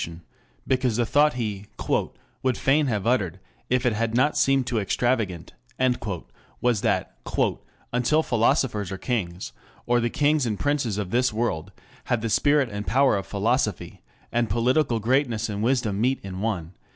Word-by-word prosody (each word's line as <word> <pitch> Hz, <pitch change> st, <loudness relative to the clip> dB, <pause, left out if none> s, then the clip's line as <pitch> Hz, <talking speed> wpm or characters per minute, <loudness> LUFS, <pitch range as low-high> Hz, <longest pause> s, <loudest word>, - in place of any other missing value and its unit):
] -, -, -35 dB, 0.2 s
because 125 Hz, -3 st, +1 dB
the 120 Hz, -, +2 dB
thought 145 Hz, +5 st, +3 dB
he 105 Hz, -5 st, -4 dB, 0.7 s
"would 130 Hz, -2 st, 0 dB
fain 145 Hz, +2 st, +2 dB
have 105 Hz, -6 st, -1 dB
uttered 100 Hz, -7 st, +1 dB, 0.3 s
if 125 Hz, +1 st, +1 dB
it 120 Hz, -, +3 dB
had 115 Hz, +1 st, -1 dB
not 140 Hz, +5 st, +3 dB
seemed 135 Hz, -1 st, +3 dB
too 120 Hz, -2 st, 0 dB
extravagant" 105 Hz, -4 st, -1 dB, 1.1 s
was 120 Hz, -4 st, +1 dB
that -, -, 0 dB, 0.8 s
"until 140 Hz, +6 st, +2 dB
philosophers 115 Hz, -, +1 dB
are 95 Hz, -, -4 dB
kings, 90 Hz, -, -3 dB, 0.3 s
or 120 Hz, 0 st, +3 dB
the 120 Hz, 0 st, 0 dB
kings 145 Hz, 0 st, +2 dB
and 105 Hz, -3 st, -2 dB
princes 140 Hz, -8 st, 0 dB
of 100 Hz, -3 st, -3 dB
this 125 Hz, +2 st, +2 dB
world 105 Hz, -6 st, -2 dB, 0.3 s
have 120 Hz, -3 st, 0 dB
the 115 Hz, -1 st, -2 dB
spirit 145 Hz, +4 st, +3 dB
and 105 Hz, -3 st, -6 dB
power 135 Hz, +6 st, +4 dB
of 100 Hz, -, -3 dB
philosophy, 105 Hz, -4 st, -1 dB, 0.3 s
and 120 Hz, -2 st, +1 dB
political 120 Hz, +4 st, +2 dB
greatness 120 Hz, -1 st, +1 dB
and 105 Hz, -1 st, -3 dB
wisdom 115 Hz, -4 st, +1 dB
meet 130 Hz, +3 st, +2 dB
in 95 Hz, -1 st, -6 dB
one... 95 Hz, -6 st, -2 dB
120 Hz, 160 wpm, -25 LUFS, 105-130 Hz, 1.1 s, power